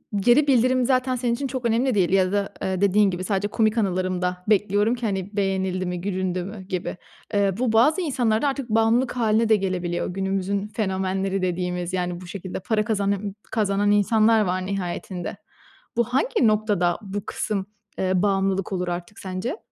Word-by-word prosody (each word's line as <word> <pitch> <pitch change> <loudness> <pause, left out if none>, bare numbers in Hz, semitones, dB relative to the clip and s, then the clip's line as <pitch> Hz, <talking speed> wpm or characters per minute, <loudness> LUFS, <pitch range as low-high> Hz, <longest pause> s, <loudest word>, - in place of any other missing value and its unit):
geri 240 +9 +4
bildirim 255 -1 +3
zaten 255 0 +1
senin 240 -1 0
için 275 +3 -2
çok 255 -2 -4
önemli 235 +2 +2
değil 185 -4 +3
ya 185 -1 +3
da, 200 -1 -1
eee, 190 0 -1
dediğin 200 0 +4
gibi, 180 +1 -4
sadece 195 +1 0
komik 220 +2 +1
anılarımda 185 -2 -1
bekliyorum 205 +2 +3
ki 240 -1 -5
hani 200 0 -3
beğenildi 190 -1 0
mi, 180 -1 -3
gülündü 185 -2 -2
mü 200 +1 -7
gibi. 185 -2 -4 0.4
Eee, 200 -2 +2
bu 250 -3 +1
bazı 295 +11 +4
insanlarda 250 -5 +1
artık 275 -3 -3
bağımlılık 225 +3 +2
hâline 225 -1 +2
de 220 - +6
gelebiliyor. 180 -3 -2
Günümüzün 195 +2 -2
fenomenleri 190 -2 -1
dediğimiz 180 0 -2
yani 180 -1 -2
bu 180 - -10
şekilde 185 0 -6
para 215 +2 0
kazana 200 -2 0 0.3
kazanan 205 -2 +1
insanlar 215 +2 +4
var 185 -2 -1
nihayetinde. 185 -1 -4 0.6
Bu 235 - +4
hangi 265 - +1
noktada, 210 -5 +1
bu 200 -1 -5
kısım, 200 -2 -3 0.3
eee, 185 0 +1
bağımlılık 195 -1 +1
olur 180 -1 -2
artık 175 +3 -5
sence? 190 - -4
200 Hz, 165 wpm, -24 LUFS, 185-225 Hz, 0.6 s, de